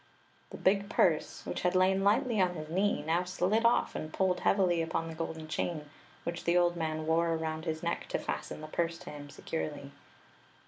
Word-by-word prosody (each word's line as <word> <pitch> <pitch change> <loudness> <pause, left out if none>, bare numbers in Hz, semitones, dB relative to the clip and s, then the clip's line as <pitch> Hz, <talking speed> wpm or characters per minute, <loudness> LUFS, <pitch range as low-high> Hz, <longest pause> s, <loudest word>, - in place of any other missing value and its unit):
The - - -8
big 200 +1 +2
purse, 160 -4 +1
which - - -3
had 180 +1 +1
lain 190 +1 +4
lightly 225 +1 +3
on 180 -1 +2
his 155 -1 -6
knee, 195 -2 +1
now 165 +3 +2
slid 185 +5 +1
off 235 - +3
and 155 - -5
pulled 185 0 +1
heavily 180 -4 +3
upon 165 0 -1
the 165 - -6
golden 160 -1 -5
chain 155 -2 -3 0.3
which 170 0 -4
the 170 +1 +4
old 175 0 +3
man 155 -2 -2
wore 165 +1 +2
around 160 0 -3
his 160 -1 -3
neck 170 - -2
to - - -1
^ten - - -4
the 155 - -6
purse 170 +1 -1
to 180 - -9
him 145 -1 -9
securely. 145 -1 -5
170 Hz, 195 wpm, -31 LUFS, 160-185 Hz, 0.3 s, lain